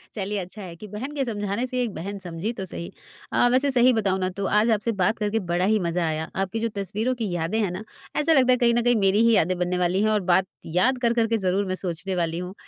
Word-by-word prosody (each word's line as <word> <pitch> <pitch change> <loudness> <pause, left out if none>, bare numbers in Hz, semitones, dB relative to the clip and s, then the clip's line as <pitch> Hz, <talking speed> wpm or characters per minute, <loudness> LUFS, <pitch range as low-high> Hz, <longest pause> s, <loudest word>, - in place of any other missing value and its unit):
चलिए 205 0 -2
अच्छा 185 +4 -8
है 175 -3 -8
कि 210 +5 -10
बहन 220 +8 -6
के 275 - 0
समझाने 205 +1 -2
से 250 0 -2
एक 225 - -3
बहन 200 +5 -6
समझी 180 +4 -4
तो 190 - -3
सही। 170 -1 -7 0.4
अ, 245 - +4
वैसे 270 +2 +3
सही 250 0 +5
बताऊँ 195 -4 +1
ना 185 0 0
तो 200 - -2
आज 225 +2 +2
आपसे 220 +2 +1
बात 215 +5 +2
करके 215 +1 0
बड़ा 180 +2 +1
ही 215 +1 +3
मज़ा 170 -1 -1
आया। 155 0 -2
आपकी 210 +4 -4
जो 230 0 -1
तस्वीरों 210 +6 -1
की 210 - -1
यादें 175 +6 -1
हैं 190 -4 0
ना 185 +4 -6 0.3
ऐसा 310 +2 +3
लगता 255 -3 +5
है 250 - +4
कहीं 235 -1 +3
न 240 0 +2
कहीं 245 -1 +3
मेरी 195 +2 +3
ही 230 - +5
यादें 180 +1 +2
बनने 180 0 0
वाली 180 +2 +1
हैं 215 - +3
और 210 - +2
बात 185 +2 +4 0.2
याद 185 +11 +2
कर 235 -1 +3
कर 230 -1 +2
के - - +4
ज़रूर 195 +2 +1
मैं 185 0 -2
सोचने 185 +2 -3
वाली 165 -1 -1
हूँ 180 +1 -6
200 Hz, 270 wpm, -24 LUFS, 180-230 Hz, 0.4 s, सही